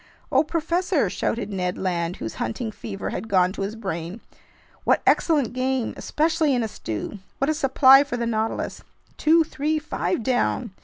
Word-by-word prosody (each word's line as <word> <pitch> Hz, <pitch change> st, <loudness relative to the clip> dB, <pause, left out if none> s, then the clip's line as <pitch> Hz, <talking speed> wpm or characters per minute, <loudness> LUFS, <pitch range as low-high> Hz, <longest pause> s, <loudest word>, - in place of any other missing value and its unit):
"Oh, 270 Hz, +3 st, +4 dB
professor!" 335 Hz, -, 0 dB
shouted 215 Hz, -3 st, -2 dB
Ned 180 Hz, -1 st, -2 dB
Land, 175 Hz, -2 st, -1 dB
whose 110 Hz, -, -6 dB
hunting 220 Hz, -, -3 dB
fever 200 Hz, -2 st, -6 dB
had -, -, -4 dB
gone 185 Hz, -2 st, +3 dB
to 195 Hz, -, -6 dB
his 200 Hz, +3 st, -3 dB
brain. 190 Hz, -2 st, -5 dB, 0.6 s
"What -, -, +2 dB
excellent 285 Hz, -9 st, +3 dB
game, 255 Hz, -1 st, -1 dB
especially 315 Hz, -2 st, +1 dB
in 240 Hz, -, +1 dB
a -, -, -1 dB
stew! 115 Hz, -, -5 dB, 0.2 s
What 275 Hz, +3 st, +1 dB
a -, -, +1 dB
supply 270 Hz, -2 st, +6 dB
for 280 Hz, -4 st, -4 dB
the 235 Hz, -, -1 dB
Nautilus! 225 Hz, -1 st, -2 dB, 0.4 s
Two, 325 Hz, +2 st, +4 dB
three, 305 Hz, +1 st, -1 dB
five 225 Hz, -, -2 dB
down! 245 Hz, -2 st, 0 dB
240 Hz, 165 wpm, -24 LUFS, 195-295 Hz, 0.6 s, supply